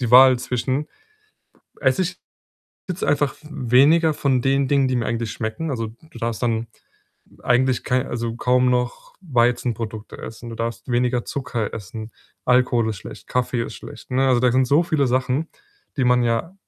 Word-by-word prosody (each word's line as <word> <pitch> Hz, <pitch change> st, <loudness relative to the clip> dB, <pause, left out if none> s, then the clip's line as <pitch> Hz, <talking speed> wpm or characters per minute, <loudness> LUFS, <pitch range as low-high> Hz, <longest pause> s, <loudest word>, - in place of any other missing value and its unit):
die 120 Hz, -3 st, -1 dB
Wahl 130 Hz, 0 st, +8 dB
zwischen, 130 Hz, +3 st, -2 dB, 0.9 s
‚esse 130 Hz, +8 st, +2 dB
ich 180 Hz, 0 st, -4 dB, 0.7 s
jetzt 180 Hz, 0 st, -3 dB
einfach 145 Hz, -1 st, +1 dB
v 150 Hz, -, -18 dB
weniger 150 Hz, +4 st, +4 dB
von 130 Hz, -4 st, +1 dB
den 135 Hz, +1 st, +2 dB
Dingen, 140 Hz, -1 st, +3 dB
die 130 Hz, -, 0 dB
mir 115 Hz, -, -1 dB
eigentlich 115 Hz, -2 st, -2 dB
schmecken?'“ 115 Hz, +9 st, -4 dB
Also, 115 Hz, -4 st, -2 dB
du 120 Hz, +9 st, -15 dB
darfst 115 Hz, 0 st, -3 dB
dann 115 Hz, -1 st, 0 dB, 0.8 s
eigentlich 125 Hz, 0 st, +2 dB
kei 130 Hz, +1 st, +1 dB
also, 115 Hz, -1 st, -3 dB
kaum 125 Hz, +1 st, +3 dB
noch 125 Hz, 0 st, -2 dB
Weizenprodukte 120 Hz, -, -1 dB
essen. 115 Hz, +1 st, -8 dB
Du -, -, -6 dB
darfst 115 Hz, +1 st, -4 dB
weniger 125 Hz, 0 st, +1 dB
Zucker 125 Hz, -5 st, -3 dB
essen. 110 Hz, +2 st, -7 dB, 0.4 s
Alkohol 125 Hz, -2 st, +3 dB
ist 105 Hz, -, -5 dB
schlecht. -, -, -11 dB
Kaffee 125 Hz, -1 st, 0 dB
ist -, -, -7 dB
schlecht, -, -, -12 dB
ne? 135 Hz, +1 st, +2 dB
Also, 125 Hz, -2 st, +4 dB
da 125 Hz, -1 st, +3 dB
sind 130 Hz, +1 st, +3 dB
so 145 Hz, +6 st, +4 dB
viele 155 Hz, -4 st, +1 dB
Sachen, 130 Hz, +5 st, 0 dB, 0.5 s
die 130 Hz, -, +2 dB
man 125 Hz, 0 st, +4 dB
ja 115 Hz, +10 st, -1 dB
125 Hz, 175 wpm, -22 LUFS, 115-135 Hz, 0.9 s, Wahl